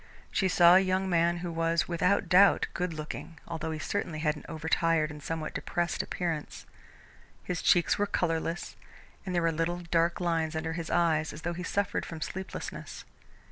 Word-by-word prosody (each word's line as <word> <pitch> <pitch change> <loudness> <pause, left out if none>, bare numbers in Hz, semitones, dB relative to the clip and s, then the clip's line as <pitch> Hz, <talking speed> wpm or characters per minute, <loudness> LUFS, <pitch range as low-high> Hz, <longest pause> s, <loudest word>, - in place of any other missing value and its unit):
She 190 - +2
saw 175 -1 +6
a 185 - +8
young 190 0 +1
man 170 0 +3
who 175 - -3
was, 165 0 +1
without 180 +3 +1
doubt, 190 +3 +6
good 180 -1 -2
looking, 155 +1 -7
although 160 -1 -4
he 160 - -3
certainly 165 0 -3
had 155 0 0
an 150 - -11
over 160 0 -6
tired 165 -2 +2
and 150 0 -9
somewhat 160 +1 -4
depressed 175 0 -1
appearance. 165 -4 -4 0.8
His 180 -2 -3
cheeks 175 +3 +3
were 205 - +2
colourless, 165 -2 -2 0.5
and 180 - -2
there 170 - +2
were 165 - +3
little 165 +2 -1
dark 170 0 +2
lines 165 -2 0
under 160 +1 -2
his 165 -1 -5
eyes 160 -3 +2
as 150 - -10
though 175 - -1
he 175 - -6
suffered 200 +2 -1
from 165 - -7
sleeplessness. 190 +4 -6
165 Hz, 180 wpm, -29 LUFS, 160-175 Hz, 0.8 s, a